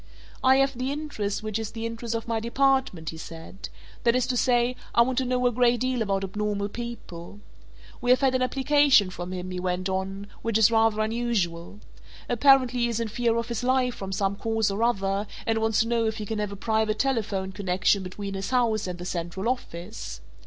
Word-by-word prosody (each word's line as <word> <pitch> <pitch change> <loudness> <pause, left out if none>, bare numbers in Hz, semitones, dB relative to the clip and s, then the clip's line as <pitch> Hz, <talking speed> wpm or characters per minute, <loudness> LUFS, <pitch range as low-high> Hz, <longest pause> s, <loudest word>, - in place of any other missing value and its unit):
"I 260 0 +6
have 275 0 +2
the 255 +2 -2
interest 250 -9 -3
which 215 0 -2
is 220 -1 -5
the 225 0 -4
interest 230 0 -4
of 230 - -4
my 230 -1 0
department," 240 - +1
he 160 - -9
said. 165 +3 -9 0.3
"That 235 0 +4
is 255 - +2
to 255 - -1
say 245 0 +2 0.2
I 235 - +7
want 255 +1 0
to 260 - -1
know 250 0 0
a 245 - +4
great 240 0 +3
deal 255 -1 0
about 195 -2 0
abnormal 205 +1 -2
people. 205 - -8 0.6
We 245 - -1
have 255 +1 +5
had 265 -1 +3
an 255 - +1
application 270 -5 +4
from 175 0 -6
him," 185 0 -5
he 180 - -3
went 180 +1 -1
on, 190 +1 -3 0.2
"which 230 -2 +1
is 225 0 +5
rather 225 -1 +3
unusual. 210 -5 -2 0.5
Apparently 255 0 +4
he 240 - +2
is 235 -1 -2
in 230 -1 -2
fear 230 +1 +1
of 230 +1 -2
his 235 0 -3
life 255 -1 +2
from 195 -3 -6
some 195 0 0
cause 220 -1 0
or 200 +3 -3
other 200 -3 +1 0.2
and 225 0 +1
wants 220 -1 +2
to 225 - 0
know 230 -1 +1
if 220 0 -2
he 215 - -4
can 220 +1 -3
have 210 -1 -2
a - - -6
private 220 +1 0
telephone 215 -7 -1
connection 190 0 +1
between 195 +2 -6
his 195 0 -4
house 230 -5 +1
and 180 -1 -4
the 175 - -7
central 180 +3 -3
office. 215 -5 -4
225 Hz, 215 wpm, -26 LUFS, 195-245 Hz, 0.6 s, I